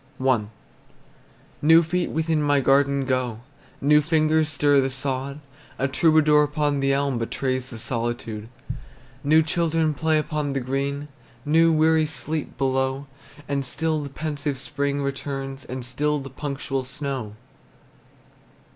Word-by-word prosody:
I. 130 -5 +2 1.2
New 165 +3 +7
feet 175 +2 -1
within 160 -1 0
my 145 -1 +3
garden 140 0 +3
go, 130 -4 -1 0.4
New 150 +2 +5
fingers 155 0 +2
stir 145 -1 +3
the 135 - 0
sod; 135 +1 -3 0.4
A 135 - +1
troubadour 155 +1 +4
upon 150 -1 0
the 135 0 +2
elm 135 -2 0
Betrays 130 +2 -2
the 120 - -8
solitude. 115 -2 -3 0.7
New 155 +3 +5
children 160 -1 +1
play 160 +2 +1
upon 150 -2 -1
the 135 - 0
green, 140 +3 -2 0.4
New 165 +2 +4
weary 160 0 +3
sleep 155 +1 -4
below; 135 +1 0 0.4
And 140 -1 -1
still 155 +4 -1
the 140 - -6
pensive 145 -1 -3
spring 140 +1 -2
returns, 135 0 -4
And 125 0 -6
still 150 +4 0
the 135 -2 -7
punctual 135 -1 -3
snow! 130 -5 -4
140 Hz, 130 wpm, -24 LUFS, 130-155 Hz, 1.2 s, New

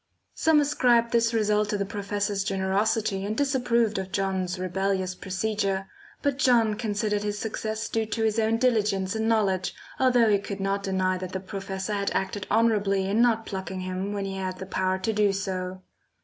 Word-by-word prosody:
Some 320 -1 +4
ascribed 245 -5 +3
this 230 -1 +3
result 210 -2 +1
to 205 - 0
the 200 - -1
professor's 205 0 -2
generosity 195 +1 0
and 210 +2 -3
disapproved 240 -6 +1
of 190 0 -5
John's 190 -2 -1
rebellious 185 0 -1
procedure; 195 0 -2 0.4
but 280 -2 0
John 235 -5 +4
considered 210 -1 -1
his 210 0 -2
success 220 +1 -3
due 225 -1 -1
to 225 +1 -2
his 220 0 +1
own 225 +1 +2
diligence 210 -6 +1
and 220 0 0
knowledge, 195 -5 +1 0.2
although 245 -3 +4
he 200 - +4
could 200 0 -6
not 195 +1 0
deny 185 -1 0
that 185 0 -6
the 190 - -2
professor 195 +1 -5
had 200 -1 0
acted 195 +1 -2
honourably 205 -3 +2
in 210 +4 +2
not 225 -2 +3
plucking 190 -1 -5
him 185 +2 -3
when 200 -1 -2
he 195 0 -4
had 185 -1 -3
the 190 - -6
power 185 0 0
to 190 +4 -1
do 210 -1 +3
so. 185 -1 -4
205 Hz, 180 wpm, -26 LUFS, 190-220 Hz, 0.4 s, Some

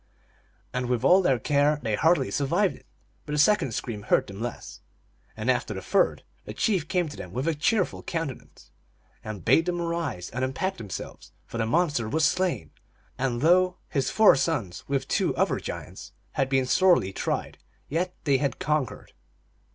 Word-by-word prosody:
And 125 0 -2
with 125 -2 0
all 185 +2 +6
their 135 -8 +2
care 145 +5 +2
they 110 -2 -1
hardly 165 +11 +2
survived 145 +4 +1
it; - - -19 0.4
but 150 - -4
the - - 0
second 150 - +3
scream 110 -4 -4
hurt 105 - +2
them 100 +1 -9
less; 120 0 -6 0.6
and - - -4
after - - +1
the - - -5
third - - +1 0.2
the - - -8
chief 185 -8 +1
came 180 -2 0
to 145 - -8
them 90 - -8
with 130 +7 -2
a 165 - +2
cheerful 185 +6 0
countenance, 165 -7 -6 0.5
and 105 -6 -7
bade 165 +2 +4
them 175 -1 -1
arise 170 - -3
and 125 +2 -3
unpack 160 +9 -2
themselves, 105 -6 -8
for 115 - -6
the 110 - 0
monster 145 -6 +1
was 155 +3 +2
slain, 180 - 0 0.5
and 125 -2 -1
though 180 +3 +4
his 135 -2 0
four 220 -7 +6
sons, 125 - -2
with 140 -1 -1
two - - +1
other - - +1
giants, - - -8 0.2
had 135 - 0
been 135 -1 +2
sorely 170 - +3
tried, - - -3 0.3
yet 180 +5 -2
they 140 -4 +3
had 140 -4 -1
conquered. 150 -2 -2
145 Hz, 175 wpm, -26 LUFS, 120-170 Hz, 0.6 s, all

